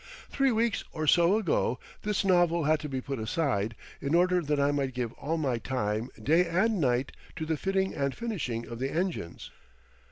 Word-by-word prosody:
Three 275 -1 +2
weeks 230 -1 +1
or 155 - -2
so 175 +6 +5
ago 165 - +1 0.2
this 210 -1 -1
novel 175 -3 +3
had 155 +1 +3
to 150 - -6
be 130 -1 -3
put 135 -1 -4
aside 110 -3 -1 0.3
in 140 +3 0
order 180 +1 +4
that 150 -2 0
I 140 +1 +3
might 135 -3 -1
give 120 -2 -2
all 160 +3 -3
my 130 -7 0
time 110 -1 -2
day 170 +4 +3
and 190 +4 +1
night 125 -1 +1 0.2
to 160 -1 -4
the 160 0 0
fitting 190 +4 0
and 140 -3 -1
finishing 160 - -3
of 115 0 -7
the 135 +1 -1
engines. 165 - -3
155 Hz, 190 wpm, -29 LUFS, 130-180 Hz, 0.3 s, so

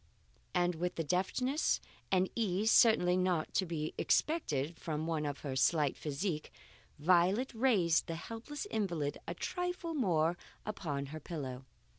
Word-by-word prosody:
And 175 0 +3
with 175 +2 -3
a 165 - 0
deftness 195 - +1 0.3
and 190 0 +3
ease 215 -1 +1
certainly 180 -6 +6
not 180 -3 0
to 190 - +1
be 155 -2 -3
expected 165 - +1
from 155 -1 -3
one 160 -2 -1
of 140 -1 -4
her 135 -3 -4
slight 145 +1 +3
physique, 155 +2 -3 0.5
Violet 185 - +3
raised 215 -9 +3
the 165 - -3
helpless 230 - -6
invalid 170 -9 -1
a 170 - -3
trifle 355 - -3
more 175 - +1 0.3
upon 155 -9 -3
her 155 - -5
pillow. 135 -5 -6
175 Hz, 140 wpm, -34 LUFS, 155-215 Hz, 0.5 s, certainly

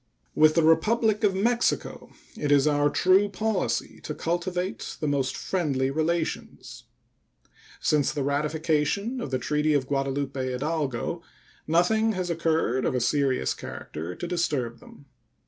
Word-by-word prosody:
With 155 0 +5
the 165 - +4
Republic 215 +7 +3
of 200 -2 +3
Mexico 235 +5 0 0.3
it 145 -1 -2
is 140 -1 +5
our 145 -1 +3
true 190 +6 +3
policy 215 +3 -2
to - - -5
cultivate 180 +2 -3
the - - -2
most 140 -2 0
friendly 140 -8 -1
relations. 160 +2 -3 0.9
Since 150 -3 +2
the 145 - -2
ratification 155 - 0
of - - -4
the 130 - 0
treaty 150 +3 +1
of 135 -2 +1
Guadalupe 135 0 -2
Hidalgo 135 0 -2 0.5
nothing 220 +8 +3
has 185 -2 -2
occurred 160 -6 0
of - - 0
a - - +2
serious 130 - +1
character 85 +3 -7
to 175 - -5
disturb 145 -10 -1
them. 140 - -16
155 Hz, 135 wpm, -26 LUFS, 140-180 Hz, 0.9 s, With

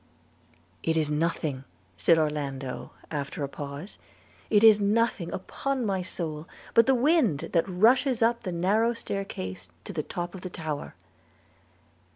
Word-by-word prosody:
'It 160 0 0
is 155 -2 +1
nothing,' 150 -3 -1 0.3
said 165 - +4
Orlando, 140 -4 -2 0.2
after 145 -1 -3
a - - -1
pause, 145 +6 -7 0.5
'it 210 0 +4
is 220 -2 +8
nothing, 205 -3 +1
upon 265 +6 -2
my 195 -3 0
soul, 165 -3 -5 0.3
but 230 +1 +6
the 265 - +5
wind 255 - +2
that 170 +2 +2
rushes 235 +6 +4
up 235 +1 +2
the 185 - -4
narrow 205 +7 +2
stair 200 -3 -3
case 95 - -7
to - - -7
the 160 - -1
top 175 +3 -5
of 190 - -8
the 185 - -5
tower.' 155 -4 -5
175 Hz, 150 wpm, -27 LUFS, 150-220 Hz, 0.5 s, is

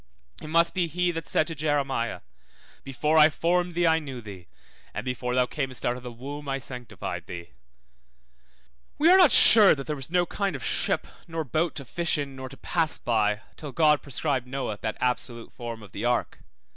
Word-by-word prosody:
It - - -8
must 165 +2 +3
be 180 -3 0
he 175 +2 0
that 165 -1 -6
said 155 - +2
to 165 - -5
Jeremiah, 140 - -1 0.6
Before 150 +4 +1
I 155 0 +8
formed 175 +2 0
thee 175 0 +2
I 160 -1 +4
knew 135 -5 -7
thee, 100 -6 -11 0.5
and - - -4
before 125 -1 -2
thou 125 -1 +3
camest 130 -1 -5
out 120 - +1
of 125 - -9
the 125 0 -8
womb 140 +4 -8
I 135 - -1
sanctified 110 -9 -7
thee. 85 0 -8 1.5
We 325 +4 +5
are 375 - +8
not 355 -7 +7
sure 210 -6 +8
that 135 -2 -7
there 150 - -3
was 135 0 -4
no 175 +1 +2
kind 195 -1 -2
of 130 - -7
ship - - 0 0.2
nor 165 -1 -3
boat 155 +3 -1
to 140 - -6
fish 170 +6 0
in, 140 -2 -4
nor 130 0 -7
to 135 - -13
pass 165 -3 +2
by, 105 -2 0 0.2
till 145 -4 -8
God 150 -3 +4
prescribed 140 -2 -2
Noah 130 -6 -4
that 110 - -3
absolute 125 -2 -2
form 115 -2 -7
of 100 - -14
the 100 - -6
ark. 120 0 -1
140 Hz, 200 wpm, -26 LUFS, 120-165 Hz, 1.5 s, I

